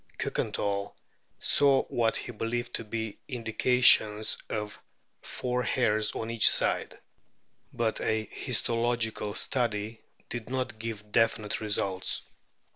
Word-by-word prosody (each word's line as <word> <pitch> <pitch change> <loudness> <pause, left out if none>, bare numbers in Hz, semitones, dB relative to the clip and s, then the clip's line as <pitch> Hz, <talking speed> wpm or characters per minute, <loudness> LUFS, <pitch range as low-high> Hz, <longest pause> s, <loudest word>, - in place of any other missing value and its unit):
Kiikenthal 100 0 -2 0.4
saw 140 -2 +4
what 115 -2 0
he - - -4
believed 120 +2 -3
to - - -1
be 110 -1 -5
indications 115 -3 +4
of 105 -1 -4 0.4
four 125 0 -2
hairs 110 -3 +1
on 110 +1 -4
each 115 -1 +5
side; - - +1 0.7
but 115 -2 -1
a 110 0 0
histolo 120 +3 0
gical 110 -2 -2
study 115 -3 -1 0.3
did 120 -1 -6
not 130 -4 -3
give 110 -2 -6
definite 115 -2 +1
results. 100 -3 0
115 Hz, 115 wpm, -28 LUFS, 105-120 Hz, 0.7 s, each